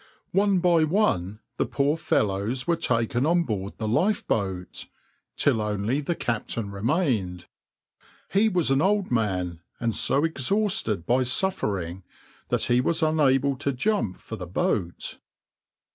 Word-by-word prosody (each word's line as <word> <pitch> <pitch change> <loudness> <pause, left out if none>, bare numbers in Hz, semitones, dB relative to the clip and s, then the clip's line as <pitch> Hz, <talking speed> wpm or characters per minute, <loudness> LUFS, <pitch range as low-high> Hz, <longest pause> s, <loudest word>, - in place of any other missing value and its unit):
One 200 0 +3
by 170 -2 +4
one 115 - 0 0.2
the - - 0
poor 140 +2 +1
fellows 110 -4 0
were 170 - +2
taken 120 -1 0
on 170 +1 +3
board 100 - -4
the 110 - -3
lifeboat, 100 - -1 0.5
till 110 - +2
only 105 +6 -1
the 170 +4 -2
captain 115 -4 -3
remained. 105 - -1 0.9
He 210 +3 +3
was 175 -8 +1
an 135 +1 +3
old 200 -1 +1
man, 90 -7 -1 0.2
and 115 -2 -1
so 140 - +2
exhausted 165 - 0
by 125 +2 +2
suffering 105 - -1 0.5
that - - +1
he 120 +1 +3
was 160 +4 0
unable 140 -3 +3
to 140 +1 -1
jump 125 - 0
for - - -8
the 90 - -7
boat. 85 0 -2
125 Hz, 135 wpm, -25 LUFS, 100-165 Hz, 0.9 s, by